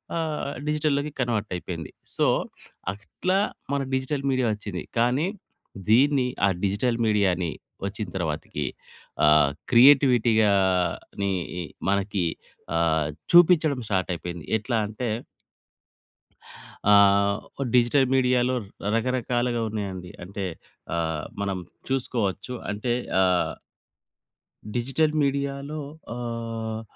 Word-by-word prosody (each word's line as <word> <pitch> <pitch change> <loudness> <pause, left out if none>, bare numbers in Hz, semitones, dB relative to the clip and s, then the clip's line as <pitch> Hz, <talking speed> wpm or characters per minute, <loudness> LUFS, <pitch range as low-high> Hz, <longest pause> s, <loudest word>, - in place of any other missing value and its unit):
ఆహ్, 155 -3 -2 0.2
డిజిటల్‌లోకి 150 -1 0
కన్వర్ట్ 115 -4 -1
అయిపోయింది. 85 -3 -6 0.2
సో, - - +3 0.7
అట్లా 180 - -2 0.4
మన 140 - +1
డిజిటల్ 135 +1 -1
మీడియా 130 -2 +1
వచ్చింది. 105 -3 -5
కానీ 125 +8 +2 0.6
దీన్ని 130 +3 +4 0.2
ఆ - - +3
డిజిటల్ 115 +5 +1
మీడియాని 95 -5 +2 0.4
వచ్చిన 105 +1 -5
తరువాతికి 80 -4 -3 0.6
ఆహ్, 75 -2 +5 0.2
క్రియేటివిటీ 125 -2 +6
గాని 95 0 +1 0.3
ఇ - - -2 0.3
మనకి 100 -2 0 0.5
ఆ! - - +3 0.6
చూపించడం 165 -5 +6
స్టార్ట్ 95 -2 0
అయిపోయింది. 85 -2 -7
ఎట్లా 115 +2 -1
అంటే 110 +2 -4 1.8
ఆహ్, 100 0 +5 0.4
డిజిటల్ 125 +3 +4
మీడియాలో 125 0 +3 0.4
రకరకాలుగా 120 0 0
ఉన్నాయండి. 95 -4 -5
అంటే 100 +2 -5 0.5
ఆహ్, 80 -2 -1 0.2
మనం 100 -1 -1 0.3
చూసుకోవచ్చు. 125 -4 -1 0.2
అంటే 120 +4 -1 0.3
ఆ - - +6 1.5
డిజిటల్ 135 +6 +1
మీడియా‌లో 140 +2 -2 0.3
ఆహ్, 115 -2 -4
115 Hz, 95 wpm, -25 LUFS, 100-130 Hz, 1.8 s, క్రియేటివిటీ